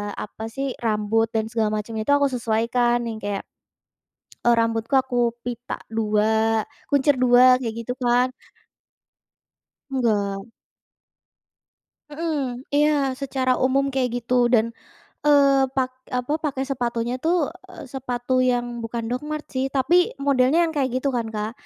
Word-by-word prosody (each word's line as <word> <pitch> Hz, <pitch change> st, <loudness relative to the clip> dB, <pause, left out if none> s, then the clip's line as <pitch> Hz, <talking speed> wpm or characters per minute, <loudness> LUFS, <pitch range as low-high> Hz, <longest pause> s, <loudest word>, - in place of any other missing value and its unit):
apa 220 Hz, +1 st, -6 dB
sih, 270 Hz, +2 st, -3 dB
rambut 220 Hz, 0 st, +1 dB
dan 220 Hz, 0 st, +1 dB
segala 225 Hz, -2 st, +1 dB
macam 225 Hz, +2 st, -9 dB
itu 215 Hz, +6 st, 0 dB
aku 285 Hz, 0 st, +4 dB
sesuaikan, 240 Hz, +1 st, +1 dB
yang 220 Hz, -1 st, -5 dB
kayak 205 Hz, -1 st, -3 dB, 1.0 s
e -, -, +5 dB
rambutku, 230 Hz, +2 st, 0 dB
aku 260 Hz, -1 st, -4 dB, 0.3 s
pita 245 Hz, 0 st, -5 dB
dua, 220 Hz, 0 st, +1 dB, 0.3 s
kuncir 285 Hz, 0 st, +4 dB
dua, 250 Hz, 0 st, +6 dB
kayak 235 Hz, -3 st, -4 dB
gitu 250 Hz, -, -2 dB
kan. 245 Hz, 0 st, +2 dB, 1.6 s
Enggak. 205 Hz, -6 st, 0 dB, 1.6 s
Mhm 290 Hz, -5 st, -3 dB
iya, 295 Hz, +1 st, +4 dB, 0.3 s
secara 260 Hz, -1 st, 0 dB
umum 270 Hz, +1 st, +2 dB
kayak 260 Hz, -2 st, +1 dB
gitu, 245 Hz, 0 st, -3 dB, 0.2 s
dan, 225 Hz, -2 st, +5 dB, 0.6 s
eee, 275 Hz, -2 st, +5 dB
pak 260 Hz, -1 st, 0 dB, 0.3 s
apa, 250 Hz, +3 st, -3 dB
pakai 270 Hz, -3 st, -1 dB
sepatunya 240 Hz, -2 st, -1 dB
tuh, 335 Hz, +2 st, +3 dB, 0.4 s
eee, 365 Hz, -, -10 dB
sepatu 250 Hz, -1 st, -3 dB, 0.2 s
yang 245 Hz, -1 st, 0 dB, 0.2 s
bukan 230 Hz, 0 st, -4 dB
Docmarts 300 Hz, +4 st, -4 dB
sih, 260 Hz, 0 st, 0 dB
tapi, 270 Hz, +5 st, +2 dB, 0.3 s
modelnya 270 Hz, +2 st, +3 dB
yang 325 Hz, -, -5 dB
kayak 270 Hz, -3 st, 0 dB
gitu 275 Hz, -, -1 dB
kan, 235 Hz, -1 st, -1 dB
Kak. 210 Hz, 0 st, -2 dB
245 Hz, 135 wpm, -23 LUFS, 225-270 Hz, 1.6 s, dua